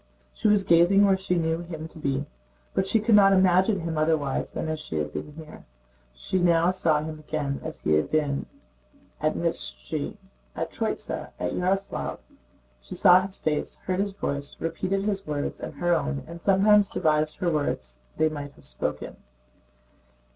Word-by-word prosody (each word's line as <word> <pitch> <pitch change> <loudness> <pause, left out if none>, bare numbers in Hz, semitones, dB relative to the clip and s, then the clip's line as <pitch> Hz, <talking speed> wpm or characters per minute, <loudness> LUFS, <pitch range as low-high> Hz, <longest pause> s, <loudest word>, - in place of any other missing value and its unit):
She - - 0
was 205 -1 +4
gazing 175 +4 +5
where 195 -1 +4
she 190 -1 -1
knew 165 -1 0
him 160 -2 -7
to 160 - -12
be; 140 -1 -1 0.5
but 190 - 0
she 225 - +3
could 220 +2 +2
not 195 -1 +7
imagine 185 +1 +4
him 165 -2 -2
otherwise 155 -3 0
than - - -4
as 155 -1 -3
he 80 - -6
had 75 -1 -2
been 150 - -6
here. 155 0 -11 0.5
She - - -2
now 170 0 +4
saw 160 -5 +1
him 155 0 -6
again 150 -2 -3
as - - -6
he 80 - +1
had 75 0 +2
been 145 -3 0 0.7
at - - +1
Mytíshchi, - - -2 0.4
at - - -3
Tróitsa, - - -3
and 90 - -2
at - - -4
Yaroslávl. 195 +2 -1 0.6
She - - -8
saw 180 0 +7
his 190 0 -5
face, 150 -1 -2
heard 185 0 -1
his 200 0 -1
voice, 140 -6 -3
repeated 185 +4 -1
his 200 -3 -2
words 145 -1 -3
and - - -7
her 175 0 +1
own, 70 - -1
and 170 +1 -10
sometimes 200 +1 +4
devised 155 0 +1
other 170 -2 +2
words 65 - -2 0.2
they 155 - +3
might 145 -2 -5
have - - -18
spoken. - - -4
165 Hz, 175 wpm, -26 LUFS, 150-190 Hz, 0.7 s, not